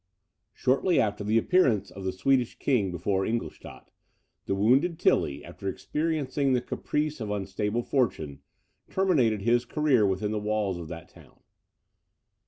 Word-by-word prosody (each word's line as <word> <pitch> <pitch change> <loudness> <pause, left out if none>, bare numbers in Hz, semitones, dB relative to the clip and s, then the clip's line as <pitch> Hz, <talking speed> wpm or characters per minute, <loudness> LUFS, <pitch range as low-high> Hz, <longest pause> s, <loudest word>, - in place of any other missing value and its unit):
Shortly 135 +7 +2
after 105 -1 0
the 110 +2 +2
appearance 115 - +2
of 95 - -9
the 95 - 0
Swedish 125 +6 +1
King 115 -9 +1
before 95 +2 -1
Ingolstadt, 115 +3 -5 0.6
the 95 - 0
wounded 135 - +3
Tilly, 70 - +1
after 100 - -6
experiencing 140 +5 -1
the 125 - +3
caprice 150 +2 -3
of 110 - -4
unstable 105 +3 -2
fortune, 80 - -1 0.5
terminated 130 - +2
his 120 +2 +3
career 145 -4 +2
within 95 +2 -1
the 110 - -1
walls 105 -3 -1
of 85 - -7
that 85 0 -8
town. - - -19
110 Hz, 140 wpm, -27 LUFS, 95-135 Hz, 0.6 s, wounded